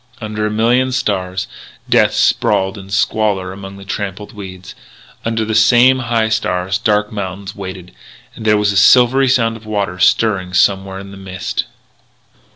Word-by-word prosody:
Under 105 -1 -3
a - - -2
million 120 +4 +1
stars, 95 -6 -2 0.4
Death - - +3
sprawled 95 0 +1
in 95 -2 -11
squalor 100 -1 0
among 95 0 -9
the 100 - -12
trampled 100 0 -5
weeds. 95 -3 -9 0.5
Under 115 -1 -1
the 110 - -3
same 120 +4 +5
high 115 -3 0
stars 95 -3 -1
dark 105 -2 +1
mountains 100 -2 -6
waited; 95 -2 -8 0.4
and - - -9
there 105 -1 +3
was 105 0 +1
a 100 - -1
silvery 125 +6 +5
sound 115 -3 +1
of 110 -1 -16
waters 100 -4 0
stirring 95 -5 0
somewhere 95 0 +2
in 100 0 -9
the 100 - -11
mist. 95 -1 -4
105 Hz, 160 wpm, -16 LUFS, 95-110 Hz, 0.5 s, same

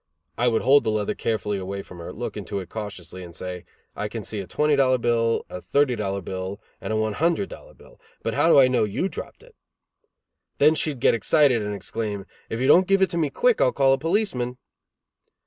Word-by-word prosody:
I 120 - +1
would 115 -2 +1
hold 140 0 +5
the 110 - 0
leather 105 -1 0
carefully 105 -3 -2
away 100 +1 -5
from 90 - -12
her, 85 - -7
look - - -5
into 100 - -5
it 95 - -8
cautiously 95 -5 -7
and 85 -1 -11
say: 90 -1 -6 0.3
"I 105 - -3
can 110 0 -6
see 105 +1 -5
a 95 - -6
twenty 150 0 +2
dollar 130 -2 +3
bill, 115 -1 +1
a 90 - -7
thirty 140 -3 +2
dollar 100 -2 -2
bill, 95 +2 -5 0.2
and - - -4
a - - 0
one 110 0 0
hundred 170 - 0
dollar - - -12
bill, - - -19 0.2
but - - -1
how 165 - +3
do 155 - +7
I 130 - +7
know 125 -3 +2
you 105 - -1
dropped - - -8
it?" 480 -2 -19 1.0
Then 150 +2 +5
she'd 150 -5 -1
get - - +5
excited 125 +1 +3
and 105 0 -3
exclaim, 100 0 -4 0.2
"If 115 - -3
you 130 - 0
don't 180 +5 +6
give 195 0 +4
it 185 - +1
to 170 - -2
me 155 -3 +1
quick 245 - +2
I'll 125 - +4
call 135 -1 +3
a - - +2
policeman." 160 - -1
115 Hz, 225 wpm, -24 LUFS, 100-145 Hz, 1.0 s, do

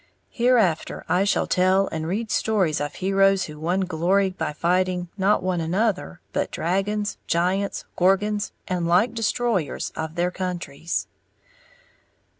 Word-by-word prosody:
Hereafter 235 -9 +1
I 185 +2 +2
shall 200 - +2
tell 185 +1 +3
and 160 0 -3
read 215 +5 -2
stories 190 -10 +1
of 145 0 -3
heroes 195 0 +3
who 150 -2 -8
won 175 +5 0
glory 185 +2 +1
by 185 - -3
fighting, 180 +2 0
not 200 0 +2
one 185 -2 0
another, 185 - -1
but - - 0
dragons, 200 +4 -1
giants, 185 +4 0
gorgons, 205 +3 +2 0.2
and 180 -3 -1
like 185 +8 +3
destroyers 225 -6 -1
of 160 0 -4
their 175 +1 0
countries. 175 -3 -3
185 Hz, 130 wpm, -24 LUFS, 170-200 Hz, 0.2 s, tell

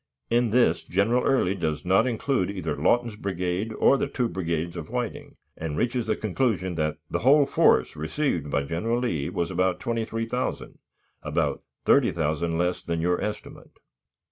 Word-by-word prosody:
In 120 0 +3
this, 120 +3 +3
General 110 +7 +1
Early 125 -9 +2
does 80 -3 -3
not 95 +7 +4
include 120 -4 0
either 100 -2 -3
Lawton's 120 -2 +1
brigade 95 +1 -2
or 135 +5 +3
the - - 0
two 125 -3 -1
brigades 85 -4 -3
with 80 -3 -6
Whiting, 125 -2 -4 0.2
and 80 -2 -4
reaches 120 -1 0
the - - +1
conclusion 105 -4 -1
that 75 -2 -1
"the - - 0
whole 140 +4 +5
force - - +3
received 80 - -2
by 70 0 0
General 85 +11 -1
Lee 85 - -1
was 85 -1 -2
about 90 -1 +1
23,000 115 +1 -3 0.4
about - - -1 0.2
30,000 80 +1 +2
less 90 +1 0
than 85 -1 -3
your 90 +2 +1
estimate." 105 0 -7
95 Hz, 155 wpm, -26 LUFS, 85-120 Hz, 0.4 s, whole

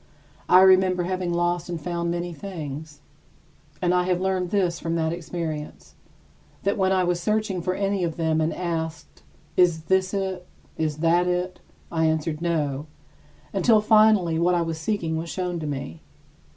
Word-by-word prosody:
I 185 - +8
remember 185 -1 +5
having 185 0 -2
lost 175 0 0
and 170 -2 -3
found 170 +1 -2
many 175 0 -3
things, 155 -3 -7 0.8
and 180 0 +3
I 180 0 +2
have 180 -1 +1
learned 185 -1 0
this 180 -4 0
from 165 0 -2
that 160 0 0
experience: 165 -3 -6 0.7
that 200 - +1
when 190 -3 +1
I 185 -1 +3
was 175 -1 0
searching 210 -2 0
for 185 +2 -1
any 195 -1 0
of 165 -2 -2
them 160 -1 +1
and 155 - +1
was - - -7
asked: 165 -2 -4 0.3
"Is 170 -3 +3
this 185 +3 +1
it? 190 -2 -3 0.3
Is 155 -2 -2
that 175 +2 +4
it?" 180 +1 -1 0.3
I 160 -1 +1
answered, 160 0 0
"No," 150 -4 -1 0.7
until 225 -3 +4
finally 215 -6 +4
what 175 +1 +3
I 170 - +2
was 165 -1 -4
seeking 160 -2 -1
was 165 +1 -4
shown 180 -1 -3
to 155 - -4
me. 135 - -5
175 Hz, 170 wpm, -24 LUFS, 160-185 Hz, 0.8 s, I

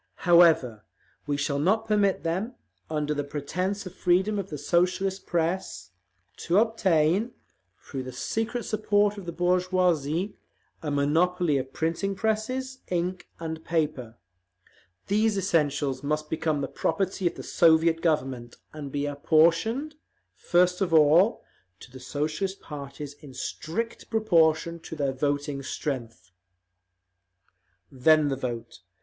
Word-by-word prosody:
However, 165 -11 +5 0.4
we 145 -1 0
shall 140 0 -1
not 215 +8 +1
permit 205 -2 +2
them, 190 +9 -2 0.3
under 150 -1 -1
the 145 -1 -2
pretence 180 +8 -3
of 185 - -8
freedom 190 +4 +1
of 195 - -5
the 150 - -5
Socialist 185 +5 0
press, 165 - -2 0.5
to 175 - 0
obtain, 205 -1 +2 0.5
through 135 - -6
the 130 0 -7
secret 225 - -3
support 210 -1 +1
of 185 - -11
the - - -2
bourgeoisie, 180 -1 +1 0.4
a 155 - -3
monopoly 155 +2 +2
of 130 0 -6
printing 165 +7 -1
presses, 240 +6 -2
ink 180 +1 -2
and 160 -1 -5
paper…. 145 -8 -2 0.9
These 215 +1 +1
essentials 145 -7 0
must 150 +1 -2
become 155 -2 0
the 135 - -2
property 185 +5 -1
of 170 - -2
the - - -8
Soviet 165 0 +3
Government, 135 -7 -1 0.2
and 145 -3 -7
be 145 +1 -2
apportioned, 165 - +2 0.4
first 180 +1 +2
of 175 -4 +2
all, 160 +8 +5 0.4
to 125 - -14
the 130 - -11
Socialist 155 +8 -3
parties 145 0 -8
in 140 -4 -12
strict 205 - -4
proportion 170 -6 +2
to 160 - -8
their 140 -3 -1
voting 145 +1 -1
strength…." 125 - -5 1.6
Then 150 +3 +4
the 135 - 0
vote. 120 -3 -5
165 Hz, 130 wpm, -26 LUFS, 145-190 Hz, 1.6 s, However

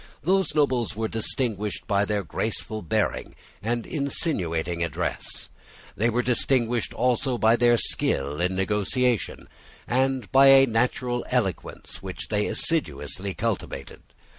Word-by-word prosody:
Those 190 +1 +1
nobles 130 -7 +1
were 110 +1 -1
distinguished 110 -3 -2
by 100 -1 +2
their 105 -1 -1
graceful 110 +4 -3
bearing 85 - -1 0.3
and 115 +2 -2
insinuating 85 - -1
address. 85 - -3 0.4
They 115 +4 +2
were 120 +2 0
distinguished 120 -1 +1
also 125 +1 +1
by 110 0 +4
their 120 0 +4
skill 75 -6 0
in 90 +1 0
negotiation, 105 +5 0 0.4
and 130 -2 0
by 135 +1 +7
a 135 0 +8
natural 120 +1 0
eloquence 115 -8 -2
which - - -6
they 105 0 +1
assiduously 95 - -1
cultivated. 115 -3 -4
115 Hz, 120 wpm, -25 LUFS, 100-130 Hz, 0.4 s, a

